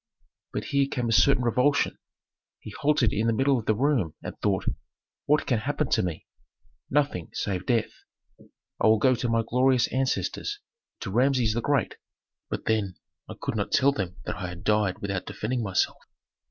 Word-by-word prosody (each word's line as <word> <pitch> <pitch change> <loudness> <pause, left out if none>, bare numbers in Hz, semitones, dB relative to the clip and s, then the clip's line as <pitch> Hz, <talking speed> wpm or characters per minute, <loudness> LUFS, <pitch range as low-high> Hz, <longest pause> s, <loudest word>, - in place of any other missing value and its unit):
But - - -3
here 140 -1 +1
came 120 -3 -2
a - - 0
certain 110 +3 +4
revulsion. 125 +4 +2 0.6
He 110 - -9
halted 145 -2 +2
in 110 +2 0
the 115 - +3
middle 135 +2 +2
of 110 - -9
the 110 - +3
room 120 - +1
and - - -6
thought, - - 0 0.6
"What 150 +1 +3
can 120 -4 +1
happen 145 +3 -2
to - - +3
me? 90 -3 -4 0.6
Nothing 140 - 0
save 95 -2 -3
death. 120 -3 +1 0.5
I - - -4
will 110 0 +6
go 130 +4 +4
to 120 0 -2
my 115 0 +2
glorious 125 0 +3
ancestors, 135 - -1 0.4
to 100 - -4
Rameses 125 -1 +2
the 120 - -1
Great 140 -4 0 0.5
But - - -4
then, 105 -4 0 0.3
I - - -7
could - - -3
not 100 -2 -2
tell 140 +2 +4
them 95 -8 -4
that - - -4
I 90 -2 -5
died 105 +2 +1
without 100 -2 -3
defending 120 +3 -2
myself. 95 -4 0
115 Hz, 175 wpm, -26 LUFS, 105-135 Hz, 0.6 s, will